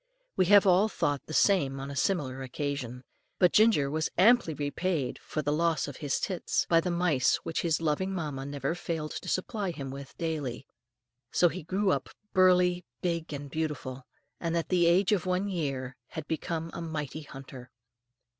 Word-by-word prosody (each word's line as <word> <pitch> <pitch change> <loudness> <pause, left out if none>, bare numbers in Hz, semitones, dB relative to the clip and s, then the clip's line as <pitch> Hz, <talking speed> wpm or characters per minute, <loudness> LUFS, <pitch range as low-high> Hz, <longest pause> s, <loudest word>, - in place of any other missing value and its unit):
We 185 - +3
have 205 +1 +7
all 190 +3 +5
thought 145 -8 -1
the - - -8
same 155 -6 +3
on 135 +1 -5
a - - -6
similar 135 -4 0
occasion. 130 -2 -4 0.3
But 180 -2 +4
Ginger 215 -10 +5
was 155 +1 0
amply 200 -4 +5
repaid 145 0 -2
for 155 - -4
the 145 +2 +1
loss 165 +1 +1
of 145 - -7
his 145 -3 -1
tits, 185 -3 -1
by 165 -1 +4
the 180 - -2
mice 170 -7 +2
which 165 - -2
his 165 -1 +1
loving 165 +5 0
mamma 150 -7 -4
never 140 +1 -2
failed 165 -3 -4
to - - -5
supply 200 +1 -1
him 140 -6 -5
with 140 0 -9
daily. 150 -6 -3 0.7
So 175 - +4
he 185 +3 -6
grew 190 +5 0
up - - -1 0.2
burly, 180 -1 +4 0.2
big, 170 -3 -1
and 145 -1 -5
beautiful; 145 -4 -4 0.3
and 170 0 -1
at 165 - -2
the 175 -2 +4
age 180 +4 +4
of 185 -4 +1
one 185 +2 +1
year 135 -8 -3
had 155 -2 -7
become 165 +1 -3
a - - -5
mighty 155 -2 -4
hunter. 135 -3 -10
160 Hz, 180 wpm, -29 LUFS, 140-180 Hz, 0.7 s, have